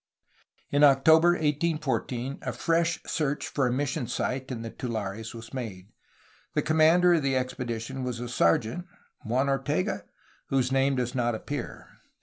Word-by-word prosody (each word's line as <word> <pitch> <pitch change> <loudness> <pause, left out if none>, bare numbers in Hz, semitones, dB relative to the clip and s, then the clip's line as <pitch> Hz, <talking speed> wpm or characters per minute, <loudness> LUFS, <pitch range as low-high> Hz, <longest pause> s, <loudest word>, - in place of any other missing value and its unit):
In 145 +1 +3
October 160 +5 +6
1814 150 -5 -1
a 125 - -3
fresh 165 +7 +1
search 145 -3 -1
for 135 -3 0
a - - 0
mission 135 0 -1
site 130 +2 -2
in 120 -3 -5
the 115 - -6
tulares 110 -1 -5
was 115 +2 -10
made. 105 -7 -6 0.7
The - - +2
commander 160 +3 +5
of 165 - +3
the 135 -1 0
expedition 125 0 -3
was 125 -2 -3
a 120 - -4
sergeant 115 - +1 0.4
(Juan 125 +5 +1
Ortega?) 135 -9 -1 0.4
whose 130 -2 +1
name 135 +1 +2
does 125 -1 -1
not 120 -2 0
appear. 145 +3 -6
130 Hz, 145 wpm, -27 LUFS, 120-145 Hz, 0.7 s, October